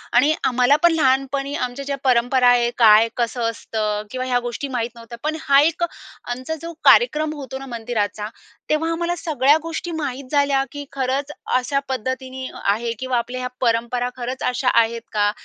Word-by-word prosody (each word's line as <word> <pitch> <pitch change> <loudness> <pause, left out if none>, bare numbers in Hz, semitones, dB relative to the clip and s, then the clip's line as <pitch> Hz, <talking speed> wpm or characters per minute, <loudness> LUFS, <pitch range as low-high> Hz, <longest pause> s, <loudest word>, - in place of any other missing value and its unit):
आणि 290 +6 +5
आम्हाला 250 +2 +4
पण 345 - +7
लहानपणी 275 -1 +1
आमच्या 250 +2 -3
ज्या 280 0 -2
परंपरा 250 0 +3
आहेत, 240 -1 +3
काय 220 -1 +7
कसं 240 0 -1
असतं 215 -2 -3
किंवा 255 0 -3
ह्या 245 -1 +2
गोष्टी 240 +3 -4
माहीत 235 0 -1
नव्हत्या. 235 0 -10
पण 310 +1 -1
हा 280 -2 +5
एक 330 +3 +1 0.4
आमचा 255 +6 -4
जो 335 0 -6
कार्यक्रम 310 -10 +5
होतो 265 -2 -6
ना 270 - -8
मंदिराचा, 220 -4 -3 0.4
तेव्हा 320 +2 +1
आम्हाला 340 +1 -1
सगळ्या 295 -2 +3
गोष्टी 330 +1 -5
माहीत 280 -4 -4
झाल्या 280 -2 +3
की 290 0 -7
खरंच 275 +2 -2 0.2
अशा 275 +2 +1
पद्धतीने 260 +1 -4 0.2
आहे 225 +4 +1
किंवा 260 -1 -1
आपल्या 245 +2 -3
ह्या 250 - -3
परंपरा 235 +1 +1
खरंच 255 +1 -4
अशा 250 +1 +1
आहेत 230 +1 -2
का? 205 -1 +2
255 Hz, 170 wpm, -21 LUFS, 240-285 Hz, 0.4 s, पण